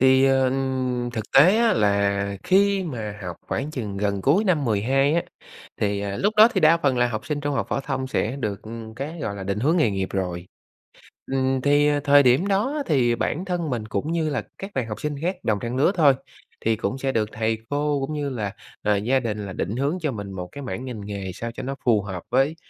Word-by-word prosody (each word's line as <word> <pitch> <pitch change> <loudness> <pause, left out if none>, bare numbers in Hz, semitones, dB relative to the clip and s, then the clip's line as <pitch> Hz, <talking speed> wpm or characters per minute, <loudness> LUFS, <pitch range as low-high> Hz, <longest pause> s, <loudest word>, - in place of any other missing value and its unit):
Thì, 130 +1 +5
ờ, 135 -1 +3 0.6
thực 110 -2 -3
tế 175 +10 +7
á 235 0 +4
là 100 -1 +1
khi 195 0 +3
mà 110 -9 -5
học 90 -3 -5
khoảng 145 +3 -3
chừng 105 -9 -5
gần 100 -1 -1
cuối 170 - +3
năm 165 -8 +2
12 130 +7 +2
á, 170 - +2 0.6
thì 100 -1 0
lúc 205 +2 +1
đó 220 +2 +9
thì - - +2
đa 160 +2 +6
phần 135 -6 +1
là 120 - +3
học 110 -2 -5
sinh 150 -1 -2
trung 145 -1 -2
học - - -1
phổ - - -1
thông 135 -1 -3
sẽ 130 -1 -1
được 105 -7 -3 0.4
cái, 155 +5 -5
gọi 100 - -3
là, 100 - -6
định 100 +1 -2
hướng 155 +7 +2
nghề 135 -11 +3
nghiệp 95 -1 -2
rồi. 90 -2 -3 0.9
Ừm, 130 0 +1
thì 145 +2 +4 0.2
thời 145 -1 +6
điểm 130 +10 +4
đó 250 +10 0
thì 120 -5 +2
bản 165 +9 -2
thân 175 -4 -2
mình 115 -4 -2
cũng 150 +8 -3
như 165 -2 0
là 145 - -2
các 195 +1 -7
bạn 125 -4 -1
học 105 - -6
sinh 150 -1 -2
khác 180 +3 0
đồng 105 -2 +1
trang 120 +1 -4
lứa 140 +7 +3
thôi, 150 -5 +6 0.5
thì 115 0 +2
cũng 115 +4 -3
sẽ 135 0 -1
được 110 -3 0
thầy 110 0 -1
cô 145 0 0
cũng 155 - -5
như 145 -2 -2
là, 105 -6 -3 0.3
ờ, 105 0 +2
gia 125 +7 +2
đình 105 -4 -3
là 95 - -6
định 95 +5 -3
hướng 140 +6 0
cho 150 - 0
mình 100 -4 -6
một 90 -1 -6
cái 140 - -8
mảng 130 -1 -5
ngành 110 -5 -6
nghề 100 -2 -5
sao 115 +4 -5
cho - - -7
nó 135 +2 -3
phù 110 -4 +4
hợp 95 -3 -6
với, 135 +5 +2
130 Hz, 235 wpm, -24 LUFS, 105-150 Hz, 0.9 s, đó